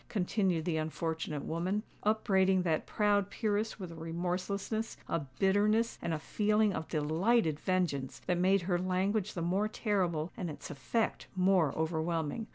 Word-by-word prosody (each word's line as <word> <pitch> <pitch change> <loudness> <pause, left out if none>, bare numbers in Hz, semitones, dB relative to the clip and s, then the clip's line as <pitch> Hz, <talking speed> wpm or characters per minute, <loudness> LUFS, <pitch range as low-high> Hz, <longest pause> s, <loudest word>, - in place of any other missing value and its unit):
continued 185 -4 0
the 170 -3 0
unfortunate 160 -1 -3
woman, 185 +6 -1 0.2
upbraiding 190 -3 +3
that 160 -3 0
proud 205 -2 +2
peeress 215 0 -1
with 185 -3 -6
a - - -9
remorselessness, 180 +6 -3
a 165 - 0 0.2
bitterness, 210 +4 +2
and 170 - -2
a 160 - 0
feeling 210 +5 +1
of 160 - -4
delighted 160 +2 +1
vengeance 165 -9 -1
that 180 -1 +1
made 190 +1 +3
her 175 0 +1
language 190 +3 0
the 170 - -2
more 190 +5 +1
terrible 185 -7 -1
and 180 - -4
its 150 - -7
effect 220 - -1
more 185 -5 +3
overwhelming. 160 +5 -1
185 Hz, 150 wpm, -32 LUFS, 165-205 Hz, 0.2 s, upbraiding